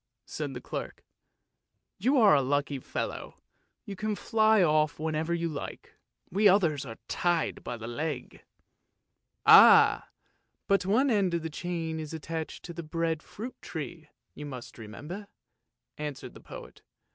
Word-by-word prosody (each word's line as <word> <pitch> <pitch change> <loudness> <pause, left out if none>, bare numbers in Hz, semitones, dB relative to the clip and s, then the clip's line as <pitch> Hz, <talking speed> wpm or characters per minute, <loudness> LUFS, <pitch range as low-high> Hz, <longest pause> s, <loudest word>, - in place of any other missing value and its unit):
said 145 -4 -5
the - - -4
clerk. - - -6 0.5
" - - -54
You 275 +3 +4
are 215 -8 +7
a 140 - +5
lucky 140 +1 -1
fellow. - - -5 0.5
You 200 - -6
can 215 +2 -2
fly 220 -2 +3
off 155 -2 +2
whenever 160 +1 -2
you 170 0 0
like, 150 -3 -7 0.4
we 205 +3 +4
others 160 -8 +2
are 115 - -8
tied 175 -2 0
by 120 - -5
the 115 - -8
leg! 140 +3 -5 0.5
" - - -53
"Ah! - - +8 0.6
but 195 -1 +2
one 255 +7 +3
end 195 -5 +2
of 170 - -2
the 160 - -4
chain 165 -1 -3
is 155 0 -6
attached 160 0 -5
to 170 - -7
the 170 - -6
bread 165 0 -2
fruit 235 +10 -9
tree, 155 0 -7 0.3
you 150 - -8
must 125 -3 -9
remember," 150 - -8 0.7
answered 150 -2 -6
the - - -13
poet. - - -11
160 Hz, 155 wpm, -29 LUFS, 150-190 Hz, 0.7 s, Ah